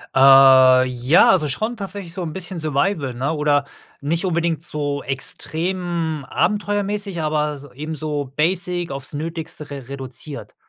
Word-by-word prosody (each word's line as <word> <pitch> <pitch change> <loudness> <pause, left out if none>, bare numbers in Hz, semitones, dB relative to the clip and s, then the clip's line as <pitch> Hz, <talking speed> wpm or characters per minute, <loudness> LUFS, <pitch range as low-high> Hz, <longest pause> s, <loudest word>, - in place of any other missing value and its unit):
Äh, 130 -1 +7
ja 125 +4 +4
also 170 -5 +2
schon 220 - -2
tatsächlich 195 -4 -7
so 185 - -5
'n 160 -3 -4
bisschen 185 0 -6
Survival, 145 -2 -1
ne? 135 +6 -1
Oder 145 -2 +1 0.3
nicht 165 +6 -1
unbedingt 170 -3 0
so 145 -3 -3
extrem 165 +3 -3
abenteuermäßig 205 -2 -1
aber 150 -1 0
s 145 0 -11
ebenso 150 -1 -4
basic 175 +1 0
aufs 135 0 -7
Nötigste 160 0 -6
re 135 -3 -7
reduziert, 135 +1 -7
155 Hz, 135 wpm, -21 LUFS, 140-175 Hz, 0.3 s, Äh